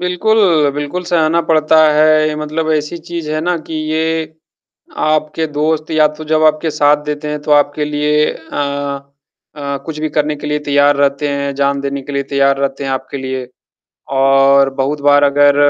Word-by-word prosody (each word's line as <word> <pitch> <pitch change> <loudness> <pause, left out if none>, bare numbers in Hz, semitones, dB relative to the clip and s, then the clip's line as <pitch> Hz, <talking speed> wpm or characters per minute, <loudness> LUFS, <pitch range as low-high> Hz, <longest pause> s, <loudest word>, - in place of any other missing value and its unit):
बिल्कुल, 180 -4 +2
बिल्कुल 145 +5 -4
सहना 170 -1 +1
पड़ता 155 0 +3 0.2
है। 155 0 +3
मतलब 155 +1 -3
ऐसी 150 +2 -2
चीज़ 165 -2 -6
है 155 - -1
ना 175 +2 -1
कि 160 - -7 0.2
ये 160 0 -2 0.7
आपके 155 +1 0
दोस्त 155 +1 -2
या 155 -1 +4
तो 155 - -7
जब 155 0 +1
आपके 155 +1 +2
साथ 150 0 +2
देते 150 0 -4
हैं, 150 0 -4
तो 150 - -5
आपके 145 +1 +2
लिए 150 0 +1
अ 140 -2 -5 0.5
अ, 140 -1 -4
कुछ 155 -2 -6
भी 155 - -1
करने 150 0 0
के 150 - -8
लिए 150 0 -1
तैयार 145 0 +2
रहते 140 +1 0
हैं, 140 0 -2
जान 140 0 0
देने 140 0 -3
के 145 +1 -8
लिए 140 - -1
तैयार 140 0 +2
रहते 140 0 -2
हैं 135 - -3
आपके 130 +1 -4
लिए। 130 -1 -4 0.7
और 135 0 +4
बहुत 140 +2 -2
बार 145 0 +4
अगर 145 0 +4
150 Hz, 180 wpm, -15 LUFS, 140-155 Hz, 0.7 s, या